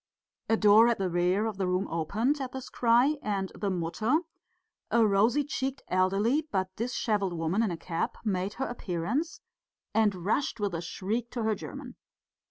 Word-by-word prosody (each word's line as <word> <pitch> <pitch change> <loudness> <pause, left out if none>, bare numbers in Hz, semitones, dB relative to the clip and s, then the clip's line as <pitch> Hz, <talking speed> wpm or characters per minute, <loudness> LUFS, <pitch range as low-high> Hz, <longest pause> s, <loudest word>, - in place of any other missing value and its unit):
_" - - +3
A - - -2
door 215 +2 +7
at 235 - +2
the 190 -2 -1
rear 180 +4 +2
of 220 -3 -3
the 190 -2 0
room 185 +2 0
opened 220 - 0
at 255 -1 -5
this 265 -1 -6
cry, 245 +5 +3
and 195 -2 -2
the 205 - -2
Mutter, 195 - 0 0.7
a 230 -1 +4
rosy 215 +8 +3
cheeked, 270 -1 -3
elderly 200 +11 +2
but 190 -1 -1
dishevelled 210 -5 -1
woman 165 +5 0
in 225 - +1
a 170 - -3
cap 165 0 -3
made 195 -1 -1
her 265 - -3
appearance, 235 - -3 0.5
and 205 -5 +1
rushed 235 +3 0
with 205 -3 -1
a 165 - -2
shriek 215 +7 -3
to 235 -2 -3
her 220 0 +2
German. 255 +4 -8
210 Hz, 180 wpm, -29 LUFS, 185-240 Hz, 0.7 s, door